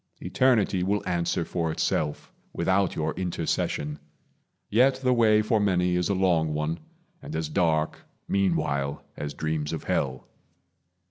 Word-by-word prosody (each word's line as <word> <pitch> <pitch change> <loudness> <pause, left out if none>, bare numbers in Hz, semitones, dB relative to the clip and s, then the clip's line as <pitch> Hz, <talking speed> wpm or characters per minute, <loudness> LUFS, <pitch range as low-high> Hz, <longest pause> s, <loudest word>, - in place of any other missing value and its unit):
Eternity 110 -8 +2
will 100 +3 0
answer 85 -1 0
for 85 -2 -1
itself, 80 -2 -2 0.2
Without 95 0 +1
your 80 0 -1
intercession; 80 -4 -2 0.7
yet 130 +5 +4
the 130 -1 +1
way 110 -3 +4
For 110 +1 +2
many 90 -3 +2
is 90 +1 0
a 100 - +1
long 85 -5 +2
one, 75 +2 -2 0.4
and 80 - -7
as 80 -1 -2
dark, 80 -3 +1 0.3
Meanwhile, 75 -7 0
as 75 -1 -5
dreams 80 -1 -2
of 80 - -4
hell. 65 -1 -1
85 Hz, 135 wpm, -26 LUFS, 80-100 Hz, 0.7 s, yet